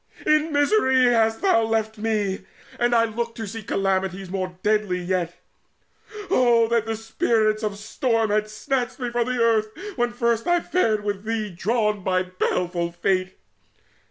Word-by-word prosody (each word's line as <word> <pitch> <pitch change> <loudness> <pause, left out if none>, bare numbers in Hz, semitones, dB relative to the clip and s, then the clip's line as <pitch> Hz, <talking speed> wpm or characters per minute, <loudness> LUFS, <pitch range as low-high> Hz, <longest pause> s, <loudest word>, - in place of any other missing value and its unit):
In 305 +1 +3
misery 285 -3 +3
hast 225 - +2
thou 375 -13 +4
left 220 -1 -1
me, 210 -3 -1 0.4
and 240 0 +2
I 230 0 +4
look 230 +1 -4
To 225 - -5
see 225 +2 -6
calamities 190 -2 -1
more 185 -2 -3
deadly 210 -3 +1
yet. 175 -1 -2 1.0
Oh 235 -2 +4
that 230 -1 +1
the 225 - -1
Spirits 220 -1 0
of 210 -2 -1
the - - -11
Storm 225 +1 0
had 215 0 +1
snatched 245 +3 -2
Me 245 -2 -3
from 240 0 0
the 250 -1 -1
earth 225 -2 +3 0.3
when 240 0 +1
first 235 -1 0
I 350 0 +4
fared 220 -13 0
with 205 -1 -3
thee 220 -2 -2
Drawn 210 +2 0
by 185 0 +1
a 185 0 -8
baleful 175 -1 0
Fate! 185 +1 -1
220 Hz, 165 wpm, -23 LUFS, 195-235 Hz, 1.0 s, thou